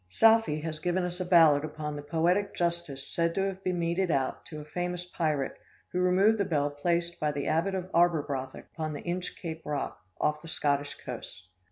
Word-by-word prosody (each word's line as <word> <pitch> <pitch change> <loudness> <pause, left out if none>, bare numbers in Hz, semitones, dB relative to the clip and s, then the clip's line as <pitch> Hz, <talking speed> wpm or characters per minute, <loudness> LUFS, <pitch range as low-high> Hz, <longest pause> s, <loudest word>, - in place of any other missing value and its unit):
Southey 225 - +5
has 155 -1 -4
given 180 +2 0
us 180 0 -3
a 185 - -1
ballad 165 -5 +6
upon 150 -1 -4
the 145 - -5
poetic 175 +7 +1
justice 170 -6 -2
said 170 0 0
to 195 - +1
have 195 0 -4
been 180 -1 0
meted 170 +2 0
out 135 -4 0
to 155 -2 -7
a 150 - -8
famous 180 +2 -3
pirate 155 -6 -1 0.4
who 180 - -1
removed 190 +4 +4
the - - +4
bell 145 -5 0
placed 170 +3 -1
by 150 -1 +1
the 140 -1 -3
abbot 170 +5 +1
of 185 -1 -3
Arberbrothok 150 -6 +1
upon 155 -2 -3
the 145 - -6
Inchcape 175 -2 -4
Rock, 145 -9 -3 0.2
off 150 0 +1
the 165 - -11
Scottish 145 -2 0
coast. 95 0 -8
170 Hz, 195 wpm, -29 LUFS, 150-180 Hz, 0.4 s, ballad